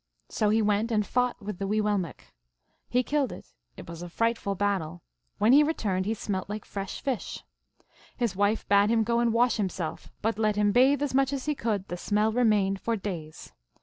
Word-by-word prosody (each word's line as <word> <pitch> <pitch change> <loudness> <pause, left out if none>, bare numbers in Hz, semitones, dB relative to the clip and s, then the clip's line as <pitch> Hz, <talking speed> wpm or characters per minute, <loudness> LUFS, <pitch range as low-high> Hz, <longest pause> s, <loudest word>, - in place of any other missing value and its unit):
So 215 - +1
he 220 +1 +3
went 210 +2 +1
and 210 -2 +1
fought 250 +2 0
with 205 -3 -6
the 195 - -2
Wee 215 +2 +1
willmekq. 205 -8 -1 0.7
He 250 +1 +2
killed 285 0 0
it. - - -11 0.2
It - - -10
was 170 0 -8
a 175 - -7
frightful 230 0 -1
battle. 180 -4 -2 0.3
When 215 +4 +4
he 290 - +8
returned 205 - 0
he 220 - +1
snielt 195 -3 -4
like 210 +1 -5
fresh 195 -1 -5
fish. 270 -5 -3 0.7
His 235 -6 -1
wife 205 +3 +1
bade 200 +1 +4
him 225 -1 +3
go 235 +2 +1
and 235 -1 +2
wash 240 +2 +3
himself; 185 -5 -3
but 220 -1 0
let 215 -1 +2
him 205 0 +2
bathe 265 +5 +4
as 285 - -2
much 270 0 +2
as 275 -2 -3
he 305 - +1
could, 215 -8 -2
the 175 - -5
smell 210 +4 +1
remained 210 -5 +2
for 230 - 0
days. 175 -7 -7
210 Hz, 205 wpm, -27 LUFS, 195-235 Hz, 0.7 s, he